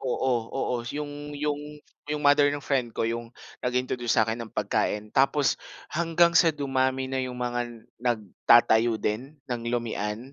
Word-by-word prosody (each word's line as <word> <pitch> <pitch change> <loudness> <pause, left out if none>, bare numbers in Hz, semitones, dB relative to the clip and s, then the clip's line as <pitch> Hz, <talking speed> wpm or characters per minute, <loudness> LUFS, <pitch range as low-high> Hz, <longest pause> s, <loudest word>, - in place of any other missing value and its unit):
oo. 130 0 0 0.2
Oo, 125 -2 -2
s 120 +4 -6
'yong 145 0 -6
'yong 145 0 -1 0.5
'yong 150 0 -2
mother 145 0 +6
ng 145 0 -3
friend 130 -4 +1
ko - - +1
'yong 115 +1 -2 0.3
nag-introduce 125 -1 0
sa'kin 110 +1 +2
ng 115 - -6
pagkain. 105 0 -1
Tapos, 135 0 +2 0.3
hanggang 170 0 +3
sa 170 0 +6
dumami 130 -3 0
na 130 0 -2
'yong 125 -1 -4
mga 120 0 -2 0.4
nagtatayo 115 0 +3
din 120 +8 -3
ng 120 -2 -4
lomihan 115 +1 -3
125 Hz, 150 wpm, -27 LUFS, 115-145 Hz, 0.5 s, mother